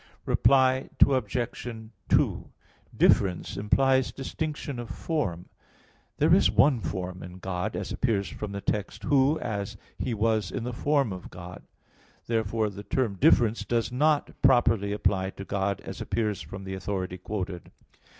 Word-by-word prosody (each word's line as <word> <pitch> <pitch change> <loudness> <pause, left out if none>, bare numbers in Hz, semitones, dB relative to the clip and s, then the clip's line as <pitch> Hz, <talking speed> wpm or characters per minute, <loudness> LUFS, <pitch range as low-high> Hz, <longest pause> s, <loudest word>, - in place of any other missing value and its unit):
Reply 130 -1 +3
Obj. 125 -2 +1 0.4
2: - - +2 0.5
"Difference" 90 -1 +3
implies 130 +6 +2
distinction 145 -1 -4
of 120 -1 -6
form. 100 - -3 0.7
There - - +4
is - - +5
one 135 -3 +4
form 90 +1 -4
in 90 0 -9
God, 95 +2 -3
as - - -4
appears 105 -6 0
from 105 -2 -6
the 100 0 -5
text, 105 0 -3
"Who, 140 +1 +3
when 100 -4 -2 0.3
He 125 -3 -1
was 110 -2 +1
in 115 - -4
the 125 +1 -4
form 140 -3 +1
of 90 - -9
God" 90 0 -10
(Phil. - - -33
2:6). - - -44
Therefore 110 -1 0
the 100 +1 -9
term 110 +1 0
"difference" 115 +3 +4
does 120 0 -1
not 150 +3 +2
properly 115 -5 +4
apply 95 -2 0
to 100 - -6
God, 100 -1 -1
as - - -8
appears 105 -3 -1
from 95 0 -8
the 95 0 -5
authority 95 -1 -4
quoted. 90 -2 -5
105 Hz, 150 wpm, -27 LUFS, 95-130 Hz, 0.7 s, is